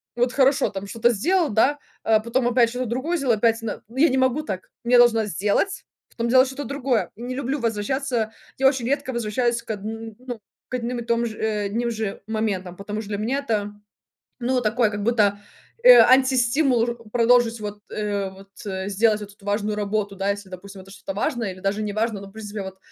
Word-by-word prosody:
вот 245 +1 +1
хорошо, 270 0 +3
там 195 0 -6
что-то 230 +2 +2
сделал, 325 - +1
да. 280 +7 +2 0.2
Э, 220 -1 +4
потом 240 +1 0
опять 240 -1 +4
что-то 250 +2 -3
другое 260 +9 -1
сделал, 265 -5 +2
опять 230 +1 +2
нэ 220 - -4
я 265 +8 +3
не 265 - 0
могу 260 +3 +2
так. 190 -9 -6 0.2
Я 245 +1 +5
должна 230 -2 +5
сделать, 210 - -1 0.3
потом 235 0 -2
делать 255 +1 +6
что-то 265 +2 -5
другое. 270 -4 -1
Не 245 +3 -5
люблю 275 +2 -2
возвращаться 230 +1 -1 0.3
я 270 - +5
очень 265 -3 +1
редко 280 -1 -1
возвращаюсь 235 +1 0
к - - -5
одн 225 +2 -6 0.2
ну, 245 -3 -5 0.3
к - - -3
одним 240 0 -3
и - - -5
том 235 0 +1
же, 220 -2 -5
э, 215 -2 -1
одним 230 +4 -1
же 220 -3 -4
моментам, 205 -5 -2
потому 210 +3 -5
что 210 - -10
для 205 - -2
меня 240 +7 -1
это 210 -2 0 0.7
ну 250 +1 +1
такой 225 0 +2
как 205 -1 -4
будто, 210 -3 +2 0.5
э, - - +10
антистимул, 255 0 +4
ру 235 -1 -5
продолжить 235 -1 +3
вот, 210 0 -6
э, 205 -2 -2
вот 195 +1 -15 0.4
сделать 215 +1 +2
вот 205 -1 -8
эту 200 - -22
важную 205 +1 -1
работу, 205 -1 -2
да. 195 +1 0
Если 200 -1 -4
допустим 190 +1 -10
это 195 +1 -14 0.2
важное 240 -9 -1
или 185 - -13
даже 195 +2 -1
неважно, 215 0 -1
но 200 - -10
в - - -17
принципе 210 -1 -6
вот 190 0 -8
230 Hz, 200 wpm, -23 LUFS, 205-250 Hz, 0.7 s, э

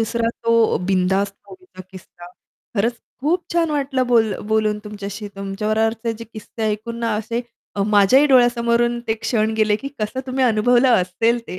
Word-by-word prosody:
दुसरा 230 +1 0 0.2
तो 230 -1 +3
बिनधास्त 195 +1 +1
मूव्हीचा 370 - -14
किस्सा. 175 -2 -13 0.5
खरंच 230 +4 +1 0.3
खूप 340 +6 0
छान 335 -2 +1
वाटलं 270 -3 -1
बोल 225 -4 +3 0.2
बोलून 215 -1 +1
तुमच्याशी. 205 0 -7
तुमच्या 195 +2 -4
बरोबरचे 225 +1 0
जे 230 +1 -9
किस्से 220 0 -9
ऐकून 230 +3 -6
ना 230 -2 0
असे 230 +3 -3 0.3
अ, 200 - 0
माझ्याही 215 +7 +5
डोळ्यासमोरून 240 -1 +3
ते 220 - +2
क्षण 220 -2 0
गेले 215 -1 +2
की 275 - -7
कसं 215 +5 -3
तुम्ही 260 0 0
अनुभवलं 245 +2 +3
असेल 225 +6 0
ते. 185 - -6
225 Hz, 160 wpm, -20 LUFS, 210-240 Hz, 0.5 s, माझ्याही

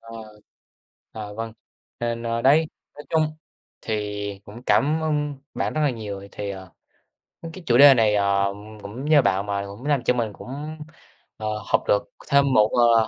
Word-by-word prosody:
Ờ, 115 -1 -9 0.9
ờ, 105 -2 -7
vâng, 115 0 -5 0.5
nên, 120 0 -2
ơ, 115 0 -2
đấy, 150 +4 +5 0.3
nói 150 - -10
chung 155 -1 +1 0.4
thì 105 -2 -4
cũng 115 +4 -11
cảm 155 +3 +3
ơn 150 -2 0 0.2
bạn - - -1
rất 155 - 0
là 150 -2 +3
nhiều, 105 -4 -6
ờ, 100 - -10
thì, 100 -1 -4
ờ, 95 -1 -8 0.7
ưm, 165 -1 -7
cái 185 +1 -10
chủ 120 - +4
đề 140 0 +10
này, 110 -4 +3
ờ, 100 -1 +2 0.3
cũng 115 +7 -7
nhờ 150 -2 +6
bạn 100 -2 +1
mà 100 -1 -2
cũng 100 +7 -10
làm 145 -4 +1
cho - - +3
mình 115 -4 -2
cũng, 145 +8 -7 0.6
ờ, 110 - -4 0.2
học - - +3
được 100 - +3 0.2
thêm 140 -1 +4
một, 105 -3 +5
ờ, 115 -2 +4
115 Hz, 185 wpm, -24 LUFS, 105-140 Hz, 0.9 s, đề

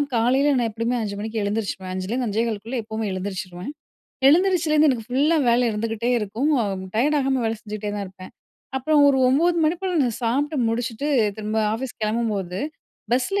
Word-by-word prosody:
காலைல 265 +5 +3
நான் 235 -2 +1
எப்டியுமே 230 +3 -1
5:00 200 -1 -4
மணிக்கு 220 0 -3
எழுந்திரிச்சுருவேன். 200 -3 -3
5:00 185 0 -4
லேருந்து, 245 +1 -1
5:15 220 0 -1
க்குள்ள 235 +5 -4
எப்பவுமே 220 0 -4
எழுந்திரிச்சுருவேன். 185 +1 -5 0.6
எழுந்திரிச்சிலேருந்து 320 -2 +4
எனக்கு 230 -3 -3
ஃபுல்லா 285 +6 +2
வேல 240 +1 +3
இருந்துகிட்டே 225 +2 -2
இருக்கும். 225 +8 -1
அ - - 0 0.3
டயர்ட் 285 +7 +2
ஆகாம 265 -1 +1
வேல 225 0 0
செஞ்சுக்ட்டே 210 -2 -5
தான் 205 -1 -3
இருப்பேன். 185 0 -12 0.4
அப்புறம் 295 +3 +3
ஒரு 270 -1 +3
9:00 340 +6 +3
மணி 315 +3 +2
போல 370 -1 -1
நான் 240 -4 -1
சாப்ட்டு 285 +6 0
முடிச்சுட்டு 230 +4 -2 0.3
திரும்ப 215 0 -2 0.2
ஆஃபீஸ் 250 +2 -5
கெளம்பும்போது, 215 -5 -1 0.5
பஸ்ல 260 +11 +1
230 Hz, 165 wpm, -23 LUFS, 210-275 Hz, 0.6 s, எழுந்திரிச்சிலேருந்து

